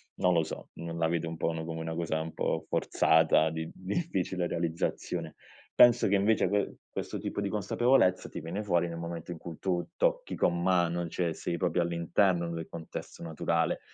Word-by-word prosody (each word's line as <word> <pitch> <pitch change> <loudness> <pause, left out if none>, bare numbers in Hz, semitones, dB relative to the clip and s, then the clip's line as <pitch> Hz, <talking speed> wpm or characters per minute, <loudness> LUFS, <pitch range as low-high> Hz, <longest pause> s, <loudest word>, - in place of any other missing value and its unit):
Non 90 0 +2
lo 85 -1 +3
so. - - -7
Non 85 0 -6
la 80 -1 +2
vede 85 0 -1
un 80 0 -5
po' - - 0
uno 80 -1 -2
come 80 0 -5
una 80 0 -4
cosa 80 -2 -1
un 80 +1 -5
po' - - -1
forzata, 80 0 +3
di 80 0 -4
difficile 95 - -2
realizzazione. 85 -1 -2 0.4
Penso, 120 -3 +6
che, 100 - +4
invece, 100 -1 +3
que 100 0 0 0.2
questo - - -4
tipo - - -4
di 100 - 0
consapevolezza, 105 0 +2
ti - - -7
viene 85 +7 -4
fuori 85 -3 +2
nel 85 - -6
momento 85 0 -6
in 85 - -5
cui 80 0 -8
tu 90 -2 -1
tocchi - - 0
con 85 0 +1
mano, 85 -1 +2
cioè 85 0 -1
sei 85 - -3
proprio 90 0 +1
all'interno 85 +1 +1
del 85 -1 -5
contesto 85 0 -8
naturale, 80 -2 0
85 Hz, 190 wpm, -30 LUFS, 80-95 Hz, 0.4 s, Penso